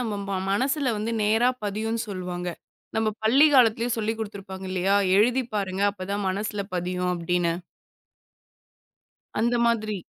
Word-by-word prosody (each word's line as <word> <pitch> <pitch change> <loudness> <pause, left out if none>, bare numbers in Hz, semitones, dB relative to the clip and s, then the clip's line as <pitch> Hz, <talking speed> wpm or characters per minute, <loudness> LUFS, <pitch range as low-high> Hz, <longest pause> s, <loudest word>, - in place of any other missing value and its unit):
நம்ம 225 -4 -2
ம 195 - -1 0.2
மனசுல 265 +4 +1
வந்து 225 +2 -2
நேரா 225 +4 +3 0.2
பதியுன்னு 220 +3 -2
சொல்லுவாங்க. 180 -2 -4 0.5
நம்ம 220 -1 +2 0.2
பள்ளி 270 +7 +6
காலத்துலயே 235 -1 +4
சொல்லிக் 220 +1 -1
குடுத்திருப்பாங்க 195 -3 -6
இல்லையா? 190 +2 +2 0.2
எழுதிப் 245 +1 +2
பாருங்க. 195 -1 -1
அப்பதான் 200 +1 -3
மனசுல 205 +1 -2
பதியும் 180 0 -1
அப்படின்னு. 170 0 0 1.9
அந்த 235 +1 +2
மாதிரி. 215 -3 0
210 Hz, 125 wpm, -25 LUFS, 190-230 Hz, 1.9 s, பள்ளி